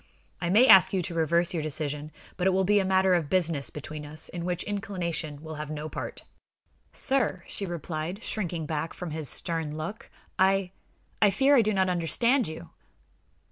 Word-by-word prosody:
"I 170 - -1
may 215 +7 +6
ask 190 -5 +8
you 185 -2 +1
to 170 - -3
reverse 170 +2 +2
your 165 - -1
decision, 150 0 -2 0.2
but 185 0 0
it - - +6
will 190 0 +2
be 205 +2 +3
a - - +1
matter 190 0 +3
of 165 -5 +1
business 165 -6 +1
between 150 +1 -7
us, 150 +1 -3
in 170 -1 -5
which 180 -1 -2
inclination 170 -7 -4
will 160 0 -7
have 150 - -6
no 155 0 -5
part." - - -6 0.7
"Sir," 255 -10 0
she 200 - -4
replied, 170 +3 -5
shrinking 175 -6 -3
back 155 +1 -3
before 180 - -6
his 155 -3 -2
stern 160 -1 -1
look, 185 +9 -6 0.3
"I 190 -1 +3 0.5
I 210 - +6
fear 275 +7 +4
I 250 - +6
do 215 -1 +1
not 190 -2 +2
understand 210 - +2
you!" 160 - -9
175 Hz, 185 wpm, -27 LUFS, 155-195 Hz, 0.7 s, ask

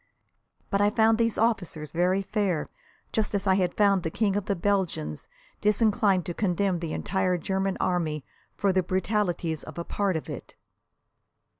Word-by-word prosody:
But 200 - +2
I 205 - +5
found 220 +1 +3
these 230 -2 +1
officers 180 -9 0
very 180 +3 +1
fair, 190 -6 -1 0.4
just 215 -1 0
as 200 0 -1
I 190 - +4
had 185 -2 0
found 200 -2 +4
the 165 - -2
King 200 +3 0
of 205 -2 -1
the 200 - 0
Belgians 175 - -1 0.3
disinclined 210 -3 +3
to 175 - -3
condemn 185 -1 0
the 165 -2 -4
entire 190 -2 0
German 190 +2 -1
Army 160 -5 -1 0.3
for 195 -2 +1
the 185 - +3
brutalities 180 -3 -1
of - - -10
a 170 - -2
part 195 +1 -1
of 160 - -3
it. - - -8
190 Hz, 165 wpm, -27 LUFS, 175-205 Hz, 0.4 s, I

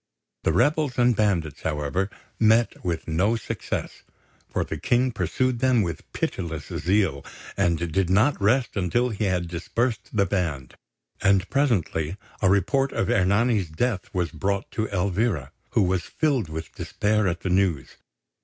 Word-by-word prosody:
The - - +4
rebels 145 - +2
and 120 -1 +4
bandits, 90 -9 0
however, 75 +5 -1 0.3
met 110 +1 +3
with 85 -3 -2
no 95 +8 +2
success, 115 - -4 0.5
for - - -1
the - - -5
King 125 +1 +2
pursued 115 +5 0
them 125 -3 +3
with 85 -5 -6
pitiless 80 -5 -3
zeal, 90 -6 +1 0.3
and 85 -1 +2
did 85 +2 -1
not 110 +6 +3
rest 120 +5 +2
until 115 +6 +1
he 110 -1 -2
had 90 -2 0
dispersed 105 +6 -2
the 100 -3 +2
band; 80 -9 -2 0.5
and 95 -1 +3
presently 100 - 0 0.2
a 95 - +4
report 130 +8 +2
of - - 0
Ernani's 100 0 +2
death 100 +5 -2
was 90 -2 -1
brought 100 0 -2
to 110 -1 -1
Elvira, 95 - -1 0.2
who - - +4
was 90 -1 +1
filled 130 - 0
with 80 +1 -6
despair 105 0 0
at 85 -1 -2
the 95 - -2
news. 90 -7 0
95 Hz, 150 wpm, -25 LUFS, 85-115 Hz, 0.5 s, The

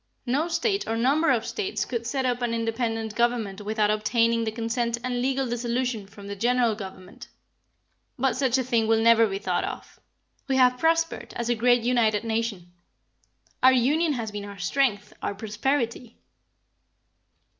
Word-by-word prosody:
No 280 +6 0
State 395 +4 0
or 225 +1 -1
number 285 +7 +2
of 240 -4 +2
States 405 -2 -2
could 235 -2 -4
set 265 +1 -1
up 245 -1 0
an 235 -1 0
independent 225 -1 -2
government 225 -4 0
without 210 0 +1
obtaining 230 +2 +1
the 220 - -2
consent 230 +1 -1
and 250 -1 -2
legal 265 +1 0
dissolution 240 -2 -2
from 200 0 -13
the 200 0 -5
General 240 +2 +2
Government. 190 -2 -10 0.9
But 265 +1 +1
such 260 -1 +1
a 260 - 0
thing 235 -3 +1
will 225 0 +3
never 230 0 +5
be 195 -1 -3
thought 200 - -1
of. - - -7 0.5
We 270 - +1
have 250 -1 +4
prospered 330 +1 0
as 235 0 -3
a - - +4
great 245 +1 +3
united 230 -3 +2
Nation. 220 -6 -3 0.9
Our 260 +1 +7
union 295 +6 +2
has 230 -4 -4
been 205 0 -5
our 200 -1 -9
strength, 210 +1 0
our 200 - -3
prosperity." 230 +3 -2
235 Hz, 165 wpm, -25 LUFS, 220-255 Hz, 0.9 s, Our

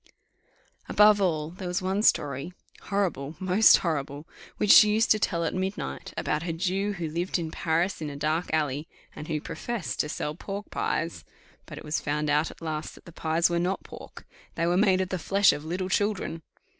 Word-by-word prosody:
Above 210 -1 +5
all 155 -5 0
others, 175 - -14
there 185 - -4
was 180 +2 -1
one 190 +2 -1
story 145 - +1 0.3
horrible! 170 -7 -2
most 190 +4 +6
horrible! 145 -1 -3 0.3
which 210 - +3
she 210 - +9
used 220 +2 +2
to 215 - +5
tell 170 -4 0
at 165 - -1
midnight, 190 +2 -4
about 150 - -1
a 170 0 -3
Jew 190 +4 -1
who 175 -4 -4
lived 170 +5 -2
in 165 -2 -4
Paris 170 +3 -1
in 150 - -3
a 145 - -7
dark 155 +4 -1
alley, 150 -1 -1 0.3
and 150 - -8
who 155 -2 -1
professed 230 +4 -5
to 150 - 0
sell 150 - -3
pork 200 +5 -7
pies; 165 +2 -2 0.4
but - - -9
it - - -9
was 150 +1 -1
found 150 0 -1
out 150 +2 +2
at - - -13
last 155 -1 -4
that - - -18
the 170 - -11
pies 160 +1 +1
were 170 0 0
not 180 +3 -1
pork - - -12 0.3
they 165 - 0
were 175 +1 +2
made 190 -1 +3
of 185 - -2
the 185 - -2
flesh 195 +4 +4
of 145 - -6
little 180 +3 -3
children. 195 -4 -1
170 Hz, 205 wpm, -27 LUFS, 155-190 Hz, 0.4 s, she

